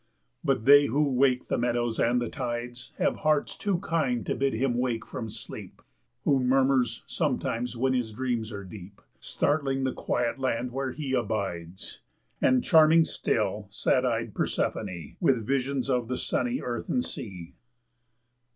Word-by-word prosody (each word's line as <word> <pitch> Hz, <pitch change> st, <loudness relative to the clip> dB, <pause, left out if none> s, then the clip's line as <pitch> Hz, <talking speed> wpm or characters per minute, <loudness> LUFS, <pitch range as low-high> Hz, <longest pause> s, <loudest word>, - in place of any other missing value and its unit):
But 130 Hz, -7 st, 0 dB
they 145 Hz, +1 st, +8 dB
who 145 Hz, +3 st, +1 dB
wake 130 Hz, 0 st, +2 dB
the -, -, 0 dB
meadows 120 Hz, -1 st, 0 dB
and 120 Hz, +1 st, +3 dB
the 120 Hz, -, -2 dB
tides 120 Hz, 0 st, -5 dB
Have -, -, +1 dB
hearts 155 Hz, -1 st, +1 dB
too 200 Hz, -4 st, 0 dB
kind 155 Hz, -, 0 dB
to -, -, 0 dB
bid 135 Hz, 0 st, 0 dB
him 120 Hz, +1 st, 0 dB
wake 120 Hz, -3 st, -1 dB
from 110 Hz, -, -6 dB
sleep -, -, -9 dB, 0.4 s
Who 140 Hz, -2 st, +3 dB
murmurs 130 Hz, -1 st, +2 dB
sometimes 120 Hz, +1 st, -2 dB
when 130 Hz, +2 st, +1 dB
his 120 Hz, -3 st, -1 dB
dreams 120 Hz, -1 st, -2 dB
are 100 Hz, -2 st, -6 dB
deep, 95 Hz, 0 st, -11 dB, 0.2 s
Startling 140 Hz, -2 st, 0 dB
the 130 Hz, -, 0 dB
Quiet 120 Hz, +2 st, -1 dB
Land 125 Hz, -1 st, -1 dB
where 135 Hz, +1 st, -2 dB
he 140 Hz, -1 st, -4 dB
abides, 95 Hz, -7 st, -3 dB, 0.4 s
And 130 Hz, -1 st, +4 dB
charming 160 Hz, +1 st, +6 dB
still, 105 Hz, -6 st, -1 dB
sad 100 Hz, -, +1 dB
eyed -, -, -1 dB
Persephone 85 Hz, -5 st, -2 dB
With 125 Hz, -5 st, +2 dB
visions 135 Hz, +1 st, 0 dB
of 125 Hz, -3 st, 0 dB
the 125 Hz, +1 st, -2 dB
sunny 125 Hz, 0 st, -1 dB
earth 120 Hz, -1 st, -4 dB
and 250 Hz, -, +1 dB
sea. 90 Hz, -5 st, -7 dB
125 Hz, 155 wpm, -27 LUFS, 115-135 Hz, 0.4 s, they